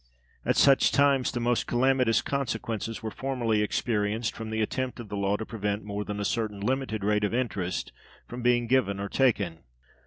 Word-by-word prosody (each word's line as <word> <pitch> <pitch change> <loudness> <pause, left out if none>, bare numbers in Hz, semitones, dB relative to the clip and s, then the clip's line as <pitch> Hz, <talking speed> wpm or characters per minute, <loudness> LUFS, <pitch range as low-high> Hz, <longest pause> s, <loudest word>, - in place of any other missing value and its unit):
At - - +1
such 135 -1 +5
times 140 -2 +3
the 120 - -3
most 120 0 0
calamitous 125 -1 +2
consequences 115 -5 -3
were 110 - -3
formerly 120 -5 0
experienced 110 +1 0
from 110 0 -6
the 110 0 -2
attempt 125 +4 -2
of 115 -3 -8
the 105 - -4
law 100 0 +1
to 110 - -5
prevent 105 -1 -3
more 100 0 -4
than 105 0 -5
a 100 - -2
certain 110 -3 -1
limited 110 -1 -1
rate 105 +1 +2
of 105 +2 0
interest 100 -8 -2 0.3
from 120 +1 -7
being 120 0 +3
given 115 -5 +1
or 100 0 -3
taken. 105 -11 +1
110 Hz, 185 wpm, -27 LUFS, 105-125 Hz, 0.3 s, such